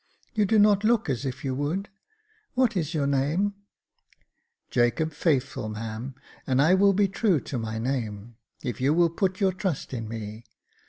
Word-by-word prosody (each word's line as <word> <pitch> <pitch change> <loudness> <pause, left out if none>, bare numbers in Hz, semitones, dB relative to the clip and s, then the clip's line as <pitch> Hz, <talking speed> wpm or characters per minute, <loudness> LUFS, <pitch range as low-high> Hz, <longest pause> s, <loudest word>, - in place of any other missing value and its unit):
" - - -37
You 215 -2 +2
do 220 +3 +3
not 205 -1 +5
look 225 -7 +2
as 130 +2 -3
if 130 +3 -5
you 130 - -1
would. 155 +9 -2 0.7
What 250 -3 +2
is 165 -2 -1
your 145 -2 +1
name? 145 +9 +1 0.6
" - - -40
"Jacob 125 +7 +1
Faithful, 135 -7 0
ma'am, 110 +4 -5 0.3
and 130 0 +2
I 155 +6 +5
will 195 +1 +5
be 200 +1 +3
true 195 -3 +2
to 130 - -4
my 110 -1 -4
name, 115 -3 -3 0.3
if 125 -2 -4
you 140 +4 +3
will 170 -1 +4
put 185 +1 -1
your 195 -2 +3
trust 185 -8 -3
in 115 -3 -4
me. 110 0 -6
145 Hz, 180 wpm, -26 LUFS, 120-190 Hz, 0.7 s, not